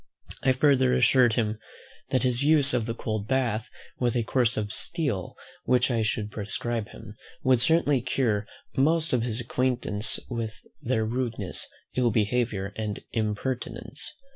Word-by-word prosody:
I 130 - +4
further 130 -2 +4
assured 125 -1 +5
him, 110 -2 0 0.5
"that 130 - +1
his 125 -1 +2
use 145 -2 +5
of 120 -3 0
the 115 - -2
cold 110 -3 -3
bath, 120 -3 0 0.3
with 120 -1 +1
a 120 - +2
course 120 -1 +1
of 105 -1 -2
STEEL 140 - -1 0.3
which 125 +1 +3
I 115 -2 +1
should 110 -1 -1
prescribe 110 +2 -3
him, 105 - -11 0.3
would 130 -2 +4
certainly 145 -3 +3
cure 110 -4 0 0.3
most 160 +3 +2
of 125 - +3
his 115 0 -1
acquaintance 120 -3 -1
of 115 -2 -2 0.3
their 115 -3 0
rudeness, 115 -4 -2 0.3
ill 125 -2 +3
behaviour, 105 -2 0
and 105 -2 -3
impertinence." 115 +3 -3
120 Hz, 145 wpm, -27 LUFS, 110-130 Hz, 0.5 s, assured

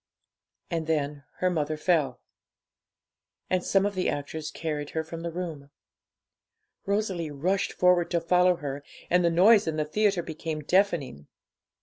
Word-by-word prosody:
And 165 -2 -2
then 145 -2 -1 0.2
her 185 0 +3
mother 155 -2 -1
fell, 150 -6 +1 1.3
and 185 -1 +2
some 195 0 +2
of 205 - -1
the 185 -1 0
actors 150 +2 -4
carried 150 -3 -4
her 160 - +1
from 165 +1 -8
the 170 - -3
room. 160 -5 -6 1.2
Rosalie 195 -5 -1
rushed 175 +7 -1
forward 180 -1 +3
to 170 - +1
follow 180 +2 +3
her, 145 -3 -6 0.3
and 180 0 +4
the 170 - +4
noise 195 +5 +5
in 160 - -1
the 155 -1 0
theatre 195 +2 +1
became 160 -1 -5
deafening. 160 - 0
165 Hz, 145 wpm, -27 LUFS, 150-180 Hz, 1.3 s, noise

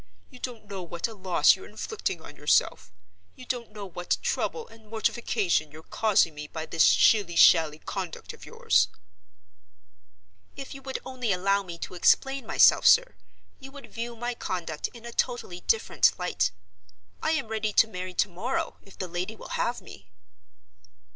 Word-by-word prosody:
You 250 - -13
don't 240 -4 -7
know 200 -2 -6
what 170 +2 -4
a 225 - -9
loss 185 -3 +4
you're - - -12
inflicting 440 0 -4
on - - -12
yourself; - - +1 0.4
you 255 - -12
don't 245 -3 -4
know 210 -1 -8
what 175 -1 -2
trouble 465 0 -2
and 220 -1 -18
mortification 215 -7 0
you're 155 +2 -13
causing 205 -6 +2
me 150 0 -7
by 160 +1 -6
this 165 0 +2
shilly 200 -6 +4
shally 160 -2 +6
conduct 185 +1 -6
of - - -15
yours." - - +2 1.7
"If 275 - -8
you 275 - -10
would 265 -1 -4
only 255 -4 -2
allow 195 +2 +2
me 175 -3 -8
to - - -7
explain 270 +9 +2
myself, - - +5
sir, - - +6 0.5
you 270 0 -11
would 280 -1 -12
view 235 +1 -5
my 240 +2 -3
conduct 170 -8 -4
in 235 -1 -14
a 235 - -6
totally 240 -9 -2
different 455 - +2
light. 180 - 0 0.7
I 315 - +1
am 275 -8 -2
ready 220 -1 -1
to 225 - +5
marry 185 -3 -6
to - - +2
morrow, 250 - -3
if 195 - -18
the 185 - -4
lady 180 +5 -4
will - - -11
have 240 +1 -1
me." 95 -2 -14
210 Hz, 170 wpm, -27 LUFS, 175-245 Hz, 1.7 s, shally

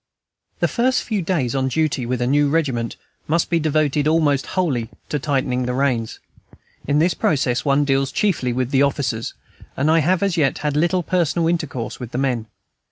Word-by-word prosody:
The - - +4
first 255 +2 +1
few 215 -4 -2
days 160 -9 -1
on 135 -1 0
duty 140 -2 0
with 125 0 -1
a - - +1
new 145 +3 +3
regiment 135 -7 -1 0.3
must 165 +2 0
be 170 - +3
devoted 150 -1 +1
almost 155 -3 +2
wholly 130 -11 0 0.2
to 150 - -1
tightening 130 -2 0
reins; 125 -3 -1 0.7
in 145 +1 +2
this 170 +4 +3
process 130 -5 0
one 145 0 +2
deals 135 -1 +1
chiefly 160 -11 0
with 125 +1 -2
the 135 - +3
officers, 135 -5 -1 0.4
and 145 +4 +2
I 165 - +5
have 175 +4 +2
as 195 -3 0
yet 145 -4 +2
had 150 - +1
but 150 - +1
little 175 +2 +1
personal 170 -1 +1
intercourse 155 -8 -2
with 125 -2 -8
the - - -2
men. 125 -4 -1
145 Hz, 185 wpm, -21 LUFS, 130-165 Hz, 0.7 s, I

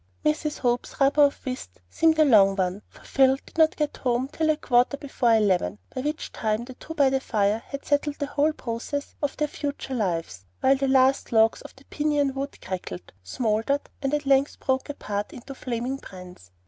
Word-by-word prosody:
Mrs. 300 0 0
Hope's 245 +2 -1
rubber 285 +2 +5
of 285 - 0
whist 255 - -6
seemed 320 - +2
a 310 - +6
long 200 -7 +6
one, 190 +1 -1
for - - -18
Phil 265 0 +3
did - - -18
not 315 -1 +5
get 300 -2 -2
home 250 0 0
till 315 +1 -1
a 310 - +3
quarter 250 0 +2
before 260 -5 +1
eleven, 205 -2 +1 0.2
by 255 - -3
which 300 +3 -3
time 220 +1 -1
the 260 - -9
two 320 +5 -9
by 280 -3 +4
the 265 - +2
fire 215 -3 0
had 280 0 -7
settled 290 0 +1
the 285 - -2
whole 290 +2 +1
progress 270 +2 -5
of 290 -2 -2
their 300 - +1
future 285 -2 -5
lives, 165 - -2 0.2
while 270 +1 +4
the 275 0 -1
last 265 0 +3
logs 225 -1 +4
of - - -12
the 265 - -19
piñon 295 -2 0
wood 275 +1 -5
crackled, 90 - -6
smouldered, 225 - -1
and 275 -1 -1
at 295 -1 -3
length 275 +1 +2
broke 265 +2 -1
apart 210 -7 -4
into 270 +3 -9
flaming 250 0 -3
brands. 180 - -12
265 Hz, 200 wpm, -25 LUFS, 220-285 Hz, 0.2 s, a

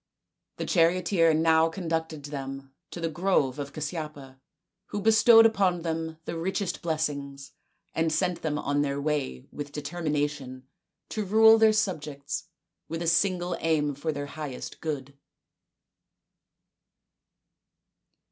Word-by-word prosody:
The - - -3
charioteer 170 -1 +3
now 160 +1 +4
conducted 160 -3 -3
them 135 -2 -7 0.2
to - - -8
the 165 - -1
grove 155 -5 +1
of 140 -1 -5
Casyapa, 150 -4 -6 0.5
who 205 - -4
bestowed 225 +2 +7
upon 190 -6 +2
them 160 -1 -3
the - - -4
richest 185 +2 -2
bless 160 -1 0
ings, 140 -1 -8 0.4
and 160 0 +1
sent 180 +2 0
them 150 -2 -1
on 145 0 0
their 140 -1 -1
way 140 - -2
with 145 -1 -7
determination 145 -4 -3 0.4
to 215 - -2
rule 220 +3 +6
their 220 0 +6
subjects 150 -9 -2 0.4
with 165 +1 -4
a - - -3
single 175 +1 +1
aim 150 -3 +1
for 145 +4 -3
their 145 -1 -4
highest 145 -3 -7
good. 140 -3 -4
160 Hz, 125 wpm, -27 LUFS, 145-175 Hz, 0.5 s, bestowed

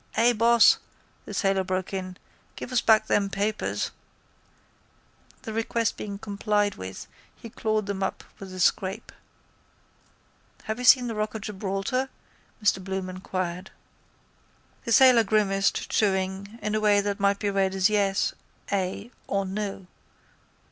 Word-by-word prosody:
—Ay, 240 +1 +5
boss, 235 +1 +5 0.5
the - - -8
sailor 195 -1 +1
broke 185 +1 -3
in. 185 -1 -5 0.4
Give - - -7
us 250 - +2
back 220 -1 +4
them 200 -2 +1
papers. 205 +2 -2 1.5
The 220 - -6
request 225 0 0
being 200 -1 -6
complied 205 0 0
with 95 +1 -8 0.3
he 230 - -11
clawed 215 -2 -1
them 200 -1 -4
up 190 - -2 0.2
with 195 -1 -9
a 185 - -8
scrape. 190 +1 0 1.5
—Have 220 +2 -4
you 250 - -3
seen 250 0 +7
the 235 - -3
rock 215 0 -3
of 220 - -4
Gibraltar? 205 +5 -2 0.5
Mr 190 -2 +2
Bloom 190 -1 -4
inquired. 185 0 -4 1.2
The 235 - -3
sailor 250 -1 +7
grimaced, 200 -2 +1
chewing, 195 +1 0
in 210 - -1
a 215 - +1
way 210 -1 +4
that 200 0 -3
might 200 0 +2
be 205 0 -1
read 195 -1 +1
as 190 -1 +4
yes, 200 -2 +1 0.4
ay 195 +4 -2 0.2
or 195 -1 0
no. 195 0 -4
200 Hz, 140 wpm, -26 LUFS, 190-215 Hz, 1.5 s, seen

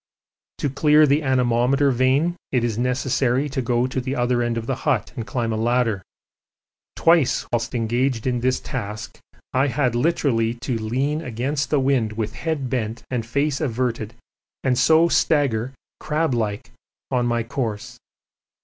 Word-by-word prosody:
To - - -1
clear 150 +3 +4
the 145 +2 +2
anemometer 130 +1 +2
vane 130 +7 +2 0.2
it 125 -3 +1
is 115 -3 0
necessary 125 +2 0
to 135 -1 -2
go 120 0 +1
to 130 0 -2
the 130 +2 -3
other 120 -1 +1
end 120 -1 -1
of 115 - -3
the - - -2
hut - - 0
and 115 - -5
climb 115 -3 -1
a - - -2
ladder. 115 -3 +1 0.9
Twice 165 -5 +3
whilst 120 +1 -1
engaged 120 +1 0
in 125 -2 0
this 130 +1 +1
task 105 -6 -6 0.3
I 130 +2 +3
had 130 -3 0
literally 120 -4 +1
to 125 +1 -3
lean 135 +8 -1
against 135 +3 -2
the 150 - +2
wind 130 -5 +1
with 110 0 -3
head 160 -5 -3
bent 115 -3 -3
and 125 -3 -1
face 140 +5 -1
averted 120 -4 -2 0.5
and 130 -2 +2
so 160 +6 +5
stagger 135 -8 +1 0.3
crab 155 -2 0
like 110 -3 -2 0.4
on 125 -2 +1
my 120 -1 0
course. 115 -3 -4
125 Hz, 160 wpm, -22 LUFS, 115-140 Hz, 0.9 s, so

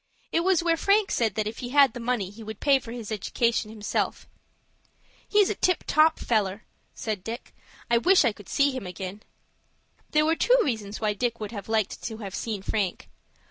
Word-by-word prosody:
It - - +2
was 355 -1 +2
where 335 -1 +2
Frank 400 +3 +3
said 225 -4 +1
that 215 - 0
if 215 +2 -5
he 245 - -5
had 275 -2 +5
the - - -6
money 230 -5 -1
he 220 +2 -12
would 220 -1 -8
pay 280 -2 +4
for 235 -3 -10
his 230 -3 -7
education 220 +2 0
himself. 215 -1 -2 1.0
"He's 415 -2 +4
a - - +1
tip 365 -2 +1
top 315 +1 +4
feller," 210 -2 0 0.3
said 210 -4 -4
Dick. 230 +2 -7 0.3
"I 235 0 +3
wish 365 +3 +5
I 235 - +3
could 205 -2 -14
see 280 0 +3
him 255 -8 -5
ag'in." 190 +2 -6 0.9
There 305 0 +3
were 325 +1 +3
two - - +4
reasons 215 -6 -3
why 215 -1 0
Dick 235 +2 -2
would 215 -1 -5 0.2
like 220 -3 +1
to 220 -2 -5
have 200 -4 -7
seen 210 -3 -4
Frank. 200 -3 -2
230 Hz, 195 wpm, -26 LUFS, 210-285 Hz, 1.0 s, had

